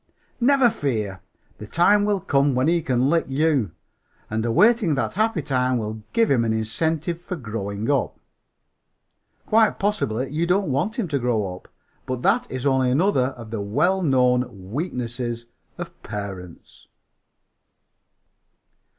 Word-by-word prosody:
Never 255 -1 +4
fear, 105 - -3 0.4
the 105 - -8
time 205 - +3
will 205 -1 +1
come 140 -4 +1
when 130 +3 +2
he 170 0 +2
can 130 -3 +1
lick 165 +3 +2
you; 135 - +1 0.6
and 110 0 -1
awaiting 195 - +3
that 115 -5 -1
happy 215 -5 0
time 130 -2 +1
will 110 -1 -4
give 230 -1 +2
him 125 -4 +3
an 115 - 0
incentive 160 +10 -1
for 180 +1 -5
growing 110 - -4
up. 140 -3 -1 1.3
Quite 220 0 +3
possibly 135 - -1
you 165 +3 -1
don't 185 -3 +1
want 165 - -1
him 230 -7 -1
to 140 -2 0
grow 110 -7 -1
up; 90 - -15 0.4
but 130 -1 -3
that - - +2
is 130 +1 -5
only 130 -2 +3
another 135 -1 +2
of 115 -2 -10
the 110 -3 -3
well 175 - +1
known 125 - +1
weaknesses 120 -5 -3 0.3
of - - -8
parents!" 100 -4 -8
130 Hz, 140 wpm, -23 LUFS, 115-170 Hz, 1.3 s, Never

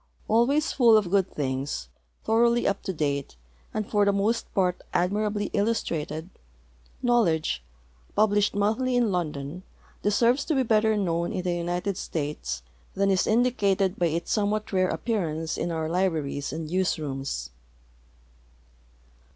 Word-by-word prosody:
Always 260 +8 +3
full 235 -4 +6
of 195 -5 0
good 195 -2 +3
things, 130 - -3 0.4
thoroughly 235 +2 +3
up 200 - 0
to - - -1
tlate, 140 - -2 0.4
and 215 -1 -3
for 205 -1 +2
the 200 - +4
most 205 +4 0
part 180 -3 +1
admirably 205 +3 0
illustrated. 170 -6 -1 0.7
Knowledge, 165 - +2 0.5
jinblished 205 -1 +3
monthly 220 +5 +1
in 240 -4 +2
London, 155 -2 -3 0.4
de 205 - +2
serves 240 +6 +3
to 315 - 0
be 265 - +3
better 220 -2 +3
known 170 -3 0
in 180 - -3
the 180 -1 0
United 175 +3 -2
States 145 - -4 0.3
than 195 0 +2
is 190 - +2
indicated 205 -5 +2
by 175 - +3
its 165 +1 -2
somewhat 210 0 0
rare 185 -1 +3
appearance 165 -8 -2
in - - -2
our 160 -1 -2
libraries 160 -5 -1
and 160 +1 -4
newsrooms. 140 - -2
190 Hz, 135 wpm, -26 LUFS, 160-215 Hz, 0.7 s, full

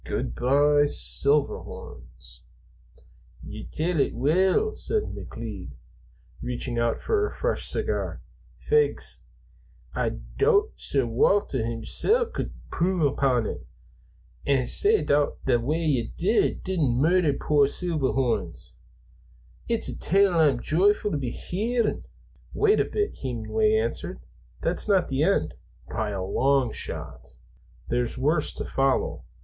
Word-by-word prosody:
Good - - -3
by, 145 +3 +3
Silverhorns!" 65 - -2 1.0
"Ye - - -8
tell 165 +1 -1
it - - +1
weel," 185 - +2
said 435 -1 0
McLeod, 110 -5 -7 0.7
reaching 125 -1 -3
out 115 -1 0
for 425 -1 +1
a - - -7
fresh - - -1
cigar. - - -2 0.4
"Fegs! 450 -1 +1 0.7
Ah - - 0 0.3
doot 425 -1 +3
Sir 135 -3 -1
Walter 130 - +2
himsel' 120 - +1
couldna - - -3 0.2
impruve 170 -5 +1
upon 125 -4 +1
it. 65 - -6 0.8
An, 135 -3 +2
sae 420 - +3
thot's 145 0 +2
the 125 -3 +3
way 155 +8 -1
ye 125 -7 0
didna 190 -2 +1
murder 155 +5 +3
puir 145 0 +2
Seelverhorrns? 135 -7 -1 1.0
It's - - +1
a - - -3
tale 195 +2 +3
I'm 150 -7 +3
joyfu' 205 +5 +2
to - - 0
be 130 -3 -3
hearin'." 225 - -2 0.5
"Wait 425 0 +3
a - - +3
bit," 420 0 -2
Hemenway 435 -1 0
answered. 450 +1 -2 0.4
"That's - - -1
not 195 -3 +2
the 135 0 -1
end, 155 - +1 0.3
by 110 -2 -2
a 95 -2 -3
long 130 +4 +1
shot. - - -6 0.5
There's 120 +1 -1
worse 150 +4 +1
to - - -4
follow. 135 0 0
145 Hz, 120 wpm, -26 LUFS, 125-195 Hz, 1.0 s, by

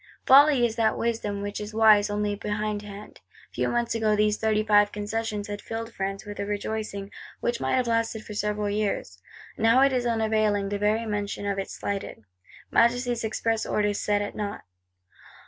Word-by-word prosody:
Folly 275 -2 +7
is 225 -1 -2
that 225 -1 +2
wisdom 210 -3 -2
which 205 +1 -4
is 210 +1 -7
wise 215 -2 +5
only 205 0 -1
behindhand. 210 0 -5 0.3
Few - - -1
months 240 -1 0
ago 220 -2 +1
these 210 0 +2
Thirty 215 -1 +1
five 205 -1 +4
Concessions 210 0 -3
had 205 0 -5
filled 230 0 -6
France 195 0 -4
with 205 0 -8
a 200 - -2
rejoicing, 205 -1 -4 0.3
which 240 - -2
might - - +1
have 255 -1 +1
lasted 230 -1 -1
for 210 - -8
several 210 0 -1
years. 205 - -2 0.4
Now 225 +4 +5
it 275 0 +4
is 245 -1 0
unavailing, 215 -3 +1
the 205 0 -2
very 215 +2 +1
mention 205 -1 -3
of 200 -1 -1
it 195 - -4
slighted; 200 - -5 0.5
Majesty's 240 0 +2
express 225 0 -1
orders 205 -1 0
set 205 0 +1
at 205 - -5
nought. 205 -1 -5
210 Hz, 175 wpm, -26 LUFS, 205-225 Hz, 0.5 s, Folly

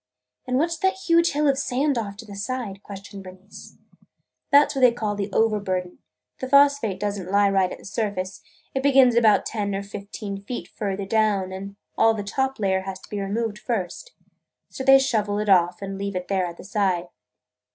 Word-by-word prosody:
"And 255 0 +1
what 330 +5 +1
's 335 - -4
that 380 +1 +2
huge 335 -3 +2
hill 295 +1 +1
of 275 -1 +2
sand 275 +1 0
off 205 -4 -4
to 225 - -10
the 205 -2 -10
side?" 205 -1 -4
questioned 200 0 -10
Bernice. 185 +2 -13 0.7
"That 290 0 +6
's - - -9
what 270 - -1
they 250 -1 +7
call 220 -3 -2
the 200 0 -4
'overburden.' 190 -5 0 0.4
The 260 - -5
phosphate 280 -8 +4
does 205 0 -2
n't 185 -1 -7
lie 200 0 +3
right 190 -2 +2
at - - -6
the - - -16
surface. 195 -3 -3 0.3
It 265 - -1
begins 265 -3 +5
about 225 -3 +4
ten 205 -3 -2
or 195 - -3
fifteen 200 0 -7
feet 240 +5 -6
further 200 -2 -3
down 205 -3 +1
and 195 +1 -7 0.2
all 225 0 +5
the 205 - -4
top 265 +6 -1
layer 190 -2 +1
has 190 0 -6
to - - -15
be 205 -1 -3
removed 210 +2 -2
first. 225 - -4 0.6
So 265 - -5
they 270 0 +8
shovel 215 -6 0
it 210 0 -1
off 180 0 +3
and 195 0 -5
leave 200 -1 -3
it 180 0 -4
there 190 -2 +1
at 170 0 -9
the - - -11
side. 185 -3 0
205 Hz, 205 wpm, -24 LUFS, 195-250 Hz, 0.7 s, they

